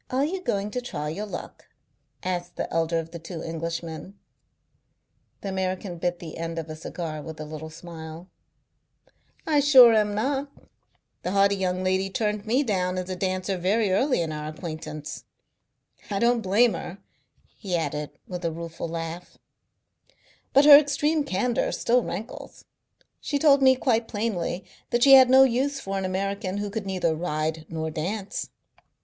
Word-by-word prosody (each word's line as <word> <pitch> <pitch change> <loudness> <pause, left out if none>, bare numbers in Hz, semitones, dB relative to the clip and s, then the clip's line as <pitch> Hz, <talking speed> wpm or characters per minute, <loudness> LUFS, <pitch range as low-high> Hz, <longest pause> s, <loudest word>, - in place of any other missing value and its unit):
"Are 265 +2 +1
you 370 +4 -3
going 205 - -1
to 250 - -3
try 150 -11 -4
your 205 +7 -4
luck?" - - -8 0.6
asked 180 -1 -3
the - - -3
elder 165 0 +1
of 165 0 -4
the 170 - -7
two 165 0 -7
Englishmen. 165 +2 -5 1.2
The 200 - -4
American 185 -1 -3
bit 175 +1 -1
the 165 -2 -9
end 165 0 -4
off 160 -1 -4
a 155 - -5
cigar 160 -1 -5
with 160 +1 -9
a 155 - -5
little 155 +1 -7
smile. 165 0 -9 1.2
"I 300 -2 +3
sure 265 -5 +8
am 210 -1 +2
not. 275 +5 -1 0.7
The 180 - -3
haughty 200 0 +4
young 185 -1 -1
lady 190 +1 +1
turned 210 +1 -2
me 255 +6 +2
down 185 -6 -1
as 185 0 -4
a - - -2
dancer 185 +1 -2
very 200 +3 +1
early 255 +2 +2
in 160 - -4
our 150 0 -5
acquaintance. 155 -1 -7 0.8
I 200 - -1
don't 235 +2 +3
blame 220 +4 +3
her," 180 - -6 0.6
he 190 -4 -3
added, 150 -2 -3 0.2
with 180 -1 -6
a 165 - 0
rueful 165 +1 -6
laugh, 165 +1 -6 1.1
"but 275 +2 +5
her 290 -1 +12
extreme 295 +1 +1
candour 240 +3 0
still 245 +1 +2
rankles. 220 -1 -7 0.5
She 290 - -2
told 280 -1 +5
me 260 -1 +6
quite 235 -3 +1
plainly 195 -5 -2 0.2
that 240 0 +2
she 275 - +8
had 260 -2 +9
no 265 +1 +8
use 270 +3 +1
for 195 -6 -3
an 190 - -3
American 195 +1 -2
who 205 0 -3
could 210 -2 -4
neither 180 -4 0
ride 155 -1 -2
nor 160 -1 -3
dance. 190 +6 -4
190 Hz, 165 wpm, -25 LUFS, 165-230 Hz, 1.2 s, her